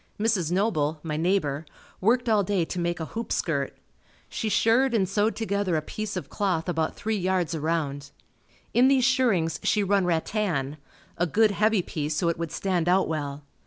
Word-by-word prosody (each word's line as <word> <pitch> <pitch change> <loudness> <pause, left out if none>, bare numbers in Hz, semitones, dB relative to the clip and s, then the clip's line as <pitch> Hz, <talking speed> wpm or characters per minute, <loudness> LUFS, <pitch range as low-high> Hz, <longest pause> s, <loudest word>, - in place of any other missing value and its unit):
Mrs. 210 -7 +1
Noble, 165 -6 0
my 155 -2 -3
neighbor 160 -3 0 0.4
worked 245 +5 +2
all 215 -3 +3
day 185 -3 0
to 180 - -5
make 175 0 -1
a 160 - -3
hoop 230 0 -4
skirt. 140 -5 -1 0.5
She 220 - -2
shirred 230 +5 +3
and 195 -4 +2
sewed 205 +3 +1
together 200 -5 -1
a 155 - +1
piece 215 +6 -5
of - - -5
cloth 185 -5 -1
about 160 -2 -1
three 220 0 -2
yards 185 -3 0
around. 150 -3 -2 0.6
In 250 +2 +5
these 265 -2 +4
shirrings 235 - +2
she 210 - +2
run 195 -1 +2
rattan 165 -5 -1 0.4
a 175 - +2
good 215 +6 +3
heavy 210 -1 +2
piece 150 -2 -3
so 170 +2 +1
it 165 - -2
would 165 -2 -3
stand 175 -1 0
out 185 +1 +3
well. 145 -2 -4
180 Hz, 180 wpm, -26 LUFS, 160-215 Hz, 0.6 s, In